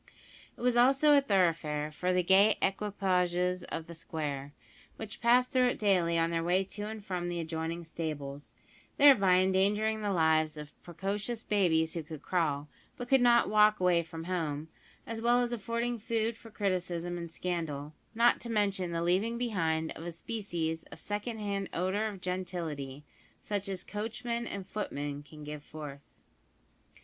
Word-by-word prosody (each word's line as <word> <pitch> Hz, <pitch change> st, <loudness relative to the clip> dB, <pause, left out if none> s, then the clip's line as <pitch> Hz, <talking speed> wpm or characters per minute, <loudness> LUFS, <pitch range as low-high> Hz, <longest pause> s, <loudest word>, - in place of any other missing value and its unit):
It -, -, -12 dB
was 245 Hz, 0 st, +2 dB
also 270 Hz, +5 st, +5 dB
a 280 Hz, -, +6 dB
thoroughfare 165 Hz, -, +1 dB
for 180 Hz, +4 st, -1 dB
the 180 Hz, 0 st, +2 dB
gay 195 Hz, +4 st, +5 dB
equipages 180 Hz, -3 st, 0 dB
of 165 Hz, -, -5 dB
the 170 Hz, -, -9 dB
square, 145 Hz, -4 st, -4 dB, 0.4 s
which 220 Hz, -2 st, -7 dB
passed 245 Hz, +2 st, +4 dB
through 255 Hz, -2 st, +4 dB
it 245 Hz, -, 0 dB
daily 180 Hz, -5 st, +2 dB
on 165 Hz, 0 st, +2 dB
their 165 Hz, 0 st, 0 dB
way 180 Hz, +3 st, +2 dB
to 205 Hz, +2 st, -6 dB
and 215 Hz, -2 st, -7 dB
from 180 Hz, -3 st, -2 dB
the 175 Hz, -1 st, -3 dB
adjoining 165 Hz, +1 st, -3 dB
stables, 145 Hz, -4 st, -6 dB, 0.4 s
thereby 210 Hz, -11 st, +7 dB
endangering 205 Hz, +4 st, +2 dB
the 205 Hz, -, -1 dB
lives 160 Hz, -3 st, +2 dB
of 150 Hz, 0 st, -8 dB
precocious 200 Hz, +6 st, -3 dB
babies 165 Hz, -6 st, +2 dB
who 170 Hz, -, -3 dB
could 155 Hz, -1 st, -9 dB
crawl, 150 Hz, -5 st, 0 dB, 0.3 s
but 245 Hz, 0 st, -6 dB
could 270 Hz, -2 st, +5 dB
not 240 Hz, -1 st, +5 dB
walk 215 Hz, 0 st, +5 dB
away 180 Hz, -2 st, +4 dB
from 165 Hz, 0 st, -8 dB
home, 160 Hz, -4 st, -2 dB, 0.4 s
as 225 Hz, 0 st, -5 dB
well 240 Hz, +1 st, +4 dB
as 245 Hz, -1 st, 0 dB
affording 235 Hz, +2 st, -2 dB
food 225 Hz, +1 st, -1 dB
for 225 Hz, 0 st, -13 dB
criticism 180 Hz, -4 st, -2 dB
and 170 Hz, -1 st, -7 dB
scandal, 160 Hz, -5 st, -3 dB, 0.2 s
not 235 Hz, +1 st, +4 dB
to 235 Hz, -, -4 dB
mention 200 Hz, -5 st, 0 dB
the 165 Hz, 0 st, -1 dB
leaving 195 Hz, +7 st, +1 dB
behind 165 Hz, -9 st, 0 dB
of 160 Hz, -, -8 dB
a 175 Hz, -, -4 dB
species 165 Hz, -4 st, -3 dB
of -, -, -12 dB
secondhand 205 Hz, -2 st, -3 dB
odour 190 Hz, +5 st, 0 dB
of 200 Hz, -4 st, -7 dB
gentility 165 Hz, -7 st, -4 dB, 0.3 s
such 200 Hz, -1 st, -3 dB
as 185 Hz, -2 st, -4 dB
coachmen 235 Hz, +2 st, -3 dB
and 195 Hz, -2 st, -5 dB
footmen 145 Hz, -9 st, -4 dB
can 150 Hz, +1 st, -13 dB
give 150 Hz, 0 st, -7 dB
forth. 145 Hz, -2 st, -8 dB
185 Hz, 165 wpm, -31 LUFS, 160-215 Hz, 0.4 s, thereby